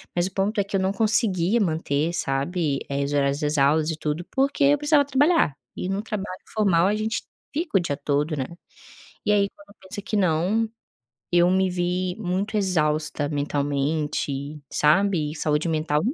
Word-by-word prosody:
Mas 175 +1 +2
o - - -9
ponto 200 +2 0
é - - +3
que 200 - -4
eu 195 - +3
não 190 +1 +1
conseguia 215 -1 +2
manter, 160 -2 0
sabe, 140 0 -1
eh, 140 0 -1
os 145 - -3
horários 140 0 +1
das 150 -1 0
aulas 150 +3 +3
e - - -3
tudo 155 +2 -3
porque 275 +2 +1
eu 290 +1 +5
precisava 295 -1 +3
trabalhar 285 - +3 0.2
e 180 - -4
num 195 +2 -1
trabalho 200 -4 -5
formal 190 -5 +3
a 210 - +1
gente 220 +1 -2 0.3
fica 305 - 0
o - - +2
dia 145 -5 -2
todo, 145 +2 0
né. 130 -2 -2 0.8
E 210 - +3
aí 200 -1 +3
quando 200 0 -19
pensa 195 +2 -7
que 215 - -4
não, 190 +4 +2 0.7
eu 175 0 +5
me 190 0 +3
vi 180 +1 -1
muito 200 +2 -2
exausta 155 -6 0
mentalmente, 145 0 -2
sabe, 155 -1 +2
saúde 150 +1 0
mental 155 -2 +1
175 Hz, 175 wpm, -24 LUFS, 150-200 Hz, 0.8 s, eu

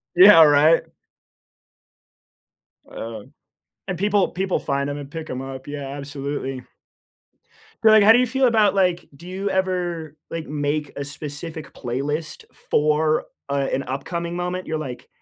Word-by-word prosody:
Yeah, 185 -1 +9
right? 150 +2 +5 2.1
Um, 110 -2 -8 0.5
and 185 - -3
people 200 +1 +2
people 190 0 -1
find 140 0 -2
'em 145 - -4
and 140 -1 -9
pick 160 0 -7
'em 130 - -4
up, 135 0 -8
yeah, 145 -1 -5
absolutely. 140 -2 -5 1.2
But, 220 - +7
like, 215 -1 +7
how 215 - +8
do 235 - +6
you 250 - +2
feel 265 +2 +1
about, 215 -4 +3
like 180 -3 +1
do 170 +5 -13
you 190 +2 -3
ever, 175 -5 -2
like, 165 -1 -5
make 150 0 -2
a 140 - -3
specific 150 +2 -7
playlist 145 +6 -4 0.2
for, 155 +1 +2 0.2
uh, 140 -1 0
an 135 - -1
upcoming 170 +6 -4
moment? 180 +1 -3
You're 160 - -2
like 130 -5 -7
155 Hz, 145 wpm, -22 LUFS, 140-180 Hz, 2.1 s, Yeah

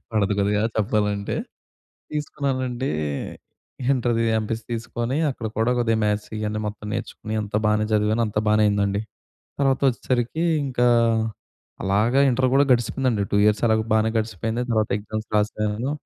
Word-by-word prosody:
పడదు 105 -2 +1
కొద్దిగా 105 +1 +2
చెప్పాలంటే. 105 -1 0 0.8
తీసుకున్నానండి 135 -4 -2 1.0
ఇంటర్‌ది 120 -3 +1 0.2
ఎంపీసీ 110 +1 -3
తీసుకొని 120 +3 -2
అక్కడ 120 -4 -5
కూడా 115 +2 +2
కొద్దిగా 115 -2 +2
మ్యాథ్స్ 105 0 0
ఇయన్నీ 105 0 -2
మొత్తం 105 0 -7
నేర్చుకొని 110 -2 -5
అంత 105 0 -5
బానే 105 0 +2
చదివాను. 105 +2 +2
అంత 105 - -5
బానే 105 0 +4
అయిందండి. 100 0 +1 0.6
తర్వాత 135 -1 +2
వచ్చేసరికి 125 +5 -1 0.2
ఇంకా 125 -2 +1 1.0
అలాగా 110 +7 +2
ఇంటర్ 130 +1 +2
కూడా 140 +1 +5
గడిచిందండి. 120 -2 +1
2 - - +3
ఇయర్స్ 105 0 +3
అలాగా 110 0 +2
బానే 110 0 +3
గడిచిపోయింది. 110 +3 -2
తర్వాత 110 -1 +1
ఎగ్జామ్స్ 110 +1 -6
రాసాను. 105 +5 -1
110 Hz, 130 wpm, -23 LUFS, 105-120 Hz, 1.0 s, కూడా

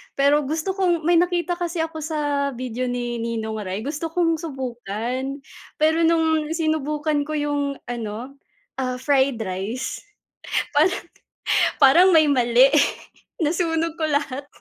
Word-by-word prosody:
Pero 285 +2 +3
gusto 320 +7 -2
kong 350 -4 +1
may 345 - +5
nakita 350 -1 0
kasi 345 -1 -3
ako 320 -1 -3
sa 290 -3 -1
video 255 0 -3
ni 240 -1 -3
Ninong 220 -2 -3
Ry 190 +2 -4
gusto 315 +2 -4
kong 330 -1 +2
subukan. 255 - -4 0.4
Pero 320 +2 +3
nung 320 -1 +2
sinubukan 305 -2 0
ko 310 - -4
yung 290 0 -1 0.3
ano, 240 +3 -5 0.4
ah, 255 -1 -2
fried 270 -3 +2
rice, 215 +6 -4 0.7
parang 350 +5 +3 0.8
parang 325 +7 +7
may 315 -1 +6
mali 250 0 +5 0.7
nasunog 325 0 0
ko 315 - +1
lahat. 285 -1 -2
290 Hz, 125 wpm, -23 LUFS, 250-320 Hz, 0.8 s, parang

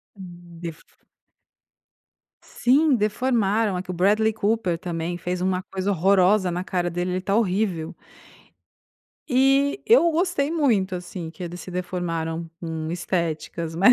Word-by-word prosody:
Hum, 175 -3 -12
derf 165 -2 -7 1.6
Sim 280 +3 +2
deformaram 215 -2 +1
aqui 180 +1 -5
o 180 - -3
Bradley 210 +5 +3
Cooper 210 -5 0
também, 175 0 -4
fez 180 +1 -3
uma 185 0 0
coisa 190 +1 -3
horrorosa 190 +1 +3
na 175 +1 -2
cara 180 -2 -1
dele, 175 +2 -2
ele 185 - -1
tá 195 +2 -1
horrível. 190 -6 0 1.4
E 270 +5 +3
eu 435 -7 +6
gostei 325 -3 0
muito, 230 - +1
assim, 175 -2 -6
que 180 - -11
eles 175 +1 -6
se 185 - -9
deformaram 170 -2 -3
num 160 -2 -4
estéticas 170 -1 -3
mas 195 +9 +6
185 Hz, 135 wpm, -24 LUFS, 175-220 Hz, 1.6 s, eu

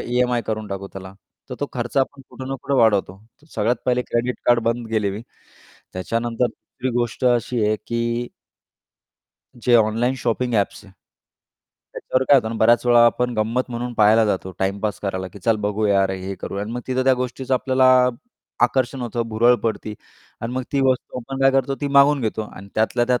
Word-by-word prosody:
EMI 125 0 0
करून 110 -1 -3
टाकू 100 0 -5
त्याला. 95 0 -9 0.4
तर 125 - -3
तो 145 - 0
खर्च 120 0 -5
आपण 135 0 0
कुठं 130 0 -8
ना 135 - -2
कुठं 140 - -1
वाढवतो. 100 -4 +2 0.3
तर - - -21
सगळ्यात 115 +3 +1
पहिले 125 0 +2
क्रेडिट 120 +2 -1
कार्ड 120 -1 +5
बंद 115 0 -1
केले 105 -3 0
मी. 105 +4 -6 0.7
त्याच्यानंतर 115 +6 -1
दुसरी 125 +2 -6
गोष्ट 120 +1 -2
अशी 120 -1 +1
आहे 110 0 +1
की 120 +1 -2 1.3
जे 120 0 +1
ऑनलाईन 115 +3 +2
शॉपिंग 120 0 -1
ॲप्स 100 -2 -1
आहेत. 100 - -17 1.0
त्याच्यावर 130 - -1
काय 145 - +8
होतं 120 -4 +1
आणि 115 - -4
बऱ्याच 120 +2 +4
वेळा 120 -1 +6
आपण 125 +1 +1
गंमत 115 +4 -1
म्हणून 120 +1 -4
पाहायला 110 +1 +5
जातो, 95 -3 -1
टाईमपास 100 +2 -1
करायला 95 -2 -3
की 100 - -13
चल 110 +4 +1
बघूया, 105 -1 +2
अरे 95 0 -1
हे 95 +1 -5
करू - - -5
आणि 105 +3 -5
मग 125 - -3
तिथं 130 0 0
त्या 130 - +5
गोष्टीचं 130 +1 -2
आपल्याला 130 0 +2 0.8
आकर्षण 130 +1 0
होतं, 120 0 -2
भुरळ 115 +3 +4
पडती. 110 -1 -2 0.5
आणि 115 +2 -4
मग 130 - -1
ती 140 - +2
वस्तू 125 0 -3
आपण 135 +3 -7
काय 135 - +6
करतो 135 0 +1
ती 145 - -1
मागून 140 +1 +5
घेतो 110 -2 -2
आणि 100 +1 -11
त्यातल्या 115 +2 +1
त्यात 125 -1 +1
120 Hz, 190 wpm, -21 LUFS, 110-125 Hz, 1.3 s, काय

